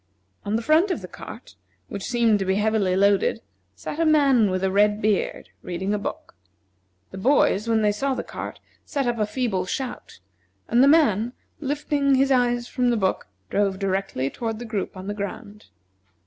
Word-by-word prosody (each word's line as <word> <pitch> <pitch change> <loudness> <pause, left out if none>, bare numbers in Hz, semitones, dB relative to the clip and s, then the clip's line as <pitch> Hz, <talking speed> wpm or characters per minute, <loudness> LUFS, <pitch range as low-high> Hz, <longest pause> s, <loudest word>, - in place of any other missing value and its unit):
On 205 +1 -1
the 230 - -1
front 315 - +4
of 365 - -2
the - - -6
cart, - - -11 0.3
which 200 -1 -6
seemed 230 -3 +2
to 195 - -1
be 190 0 +1
heavily 210 -3 +1
loaded, 200 0 +3 0.4
sat 195 - -6
a - - +3
man, 280 -9 +4
with 185 0 -2
a 190 - +1
red 205 +1 +3
beard, 210 -2 -1
reading 190 +3 -3
a 210 - 0
book. - - -6 0.8
The 190 - -7
boys, 230 -2 +3
when 225 -1 +2
they 210 - +4
saw 270 +6 -1
the - - -3
cart, - - -7 0.2
set 280 -3 -2
up 240 -1 -1
a 210 - +1
feeble 210 -7 -1
shout, 260 +4 -5 0.5
and 240 +2 +3
the 270 - +6
man, 245 -7 +3 0.3
lifting 285 -1 +1
his 270 +1 +2
eyes 245 -2 +2
from 250 - -1
his 240 - +2
book, 190 -2 -1 0.2
drove 200 -1 +1
directly 190 -9 -2
toward 225 -2 -4
the 240 - -7
group 210 -4 -4
on 185 - -8
the 205 - -3
ground. 205 +1 -7
215 Hz, 190 wpm, -24 LUFS, 195-255 Hz, 0.8 s, the